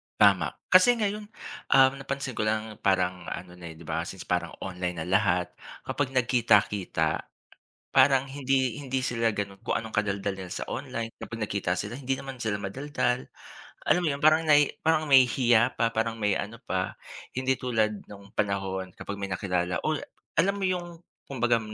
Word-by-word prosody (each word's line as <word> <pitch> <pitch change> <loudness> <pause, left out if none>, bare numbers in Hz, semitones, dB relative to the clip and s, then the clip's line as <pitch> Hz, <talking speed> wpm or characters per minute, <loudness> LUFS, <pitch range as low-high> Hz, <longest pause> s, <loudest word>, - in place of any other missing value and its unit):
Tama. - - +4 0.2
Kasi 185 +7 +7
ngayon, 210 -1 -2 0.4
um, 130 0 +7
napansin 135 -1 -4
ko - - -2
lang 110 0 -2
parang 95 -2 +1
ano 90 0 -6
na, 85 - -8
eh, - - -12
'di 85 - -12
ba, 80 0 -1
since 95 - -7
parang 90 -1 -1
online 90 -2 -3
na - - -8
lahat, 90 -2 +2 0.3
kapag 145 -2 -1
nagkita-kita 115 -6 +2 0.7
parang 135 -1 +5
hindi 135 -3 0
hindi 135 -2 -2
sila 115 -3 0
ganon 100 -1 -4
kung - - 0
anong 110 - -2
kadaldalan 100 -2 -1
nila 90 - -7
sa - - -5
online. 125 -3 -4
Kapag 115 -1 -7
nakita 100 -4 -1
sila 100 +6 -4
hindi 135 -1 -1
naman 135 0 -8
sila 110 -4 -2
madaldal. 125 +3 -1 0.6
Alam 180 - +4
mo - - +2
'yon 140 - -6
parang 155 +1 +6
nai 145 -1 +5
parang 160 -1 +3
may 135 -2 +8
hiya 120 -1 +3
pa 115 0 +2
parang 115 0 0
may 105 -1 +2
ano - - -5
pa. - - -2 0.4
Hindi 130 +1 +1
tulad 110 -4 0
nong 100 -1 -12
panahon 95 -2 -1
kapag 100 - -6
may 100 - -2
nakilala, 90 -1 -1
uy, 155 -1 +1 0.4
alam 195 +4 +3
mo 200 - -4
yung 175 -2 -3 0.3
kumbaga 120 -3 +1
115 Hz, 175 wpm, -27 LUFS, 100-135 Hz, 0.7 s, may